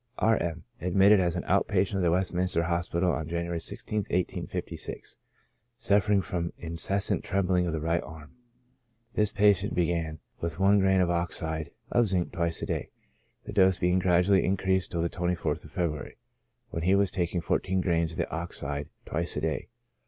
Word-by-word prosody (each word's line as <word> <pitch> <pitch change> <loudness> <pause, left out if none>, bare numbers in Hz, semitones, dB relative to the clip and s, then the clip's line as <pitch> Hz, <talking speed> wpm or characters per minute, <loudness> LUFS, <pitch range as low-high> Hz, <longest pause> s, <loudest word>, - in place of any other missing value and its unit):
R. 115 +1 +3
M 85 -1 -3
—, - - -33
admitted 95 +4 +5
as 90 -2 +1
an 90 - -2
out 100 +1 +2
patient 100 0 +1
of - - 0
the 85 - +3
Westminster 90 -1 +1
Hospital, 85 +1 0
on 80 -2 -3
January 85 0 -2
i6th, - - -7
1856, 95 -4 -3 0.6
suffering 105 -3 +3
from 85 -2 -3
incessant 85 +4 +1
trembling 90 -2 +1
of 85 - -2
the 80 - -1
right 85 +2 0
arm. 75 -2 -11 0.8
This 105 -1 +1
patient 100 0 +3
began 85 -2 0 0.2
with 85 -1 -3
one 100 +1 +4
grain 95 -1 +3
of 90 -1 +2
oxide 80 -2 -2 0.2
of 120 -2 +3
zinc 90 -2 0
twice 85 -1 -1
a - - 0
day, - - -3 0.5
the - - -8
dose 95 -3 +4
being 90 +1 +2
gradually 90 +1 +3
increased 95 -1 +1
till 85 -1 -1
the - - +2
24th 85 -3 -2
of 75 - -13
February, 80 -5 -3 0.5
when 80 - -3
he 95 +4 +3
was 100 -1 +2
taking 90 -1 -1
four 85 - +1
teen 95 0 -1
grains 85 -3 +1
of - - -10
the - - -2
oxide 75 -3 -4 0.2
twice 85 +1 -2
a - - -1
day. 80 -2 -2
90 Hz, 180 wpm, -28 LUFS, 85-95 Hz, 0.8 s, admitted